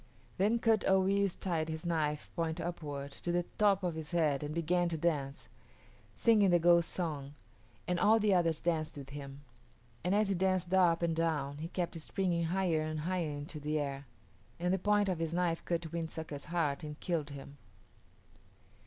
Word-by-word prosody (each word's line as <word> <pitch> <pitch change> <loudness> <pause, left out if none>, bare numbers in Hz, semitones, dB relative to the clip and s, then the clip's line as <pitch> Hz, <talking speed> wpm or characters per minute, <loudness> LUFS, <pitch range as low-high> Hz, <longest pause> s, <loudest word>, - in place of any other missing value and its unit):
Then 210 +5 +3
Kut 225 -3 +2
o 190 0 +4
yis´ 200 0 +1
tied 165 -4 -1
his 160 +1 -5
knife, 150 -3 -1
point 165 -1 -1
upward, 145 -5 -5
to 175 - -4
the 175 0 +1
top 200 -2 +4
of 175 -2 0
his 160 -2 -6
head 150 -5 +2
and 150 0 -4
began 170 +2 +1
to 165 - -2
dance, 150 -4 -1 0.7
singing 215 -4 +4
the 175 - +5
ghost 170 0 +4
song, 145 -6 -4 0.5
and 180 -1 0
all 220 +4 +5
the 210 -2 +3
others 165 -3 +2
danced 160 -3 -1
with 140 -1 -9
him; 140 -1 -8 0.6
and 180 +3 +2
as 210 -1 +2
he - - +2
danced 185 -1 0
up 175 -3 +4
and 165 -1 +1
down 150 -4 -1
he 160 - -4
kept 175 -1 -3
springing 175 -1 0
higher 175 -2 +1
and 155 0 -3
higher 175 -1 -1
into 145 +1 -6
the 150 +1 -1
air, 140 -1 -4 0.5
and 180 +1 +1
the 190 - +1
point 205 +1 +2
of 180 -3 -1
his 165 0 -2
knife 175 -2 0
cut 170 -2 -2
Wind 165 -1 -3
Sucker's 155 -4 -6
heart 160 -5 -1
and 150 0 -7
killed 160 -5 -2
him. 140 0 -10
170 Hz, 190 wpm, -33 LUFS, 150-180 Hz, 0.7 s, the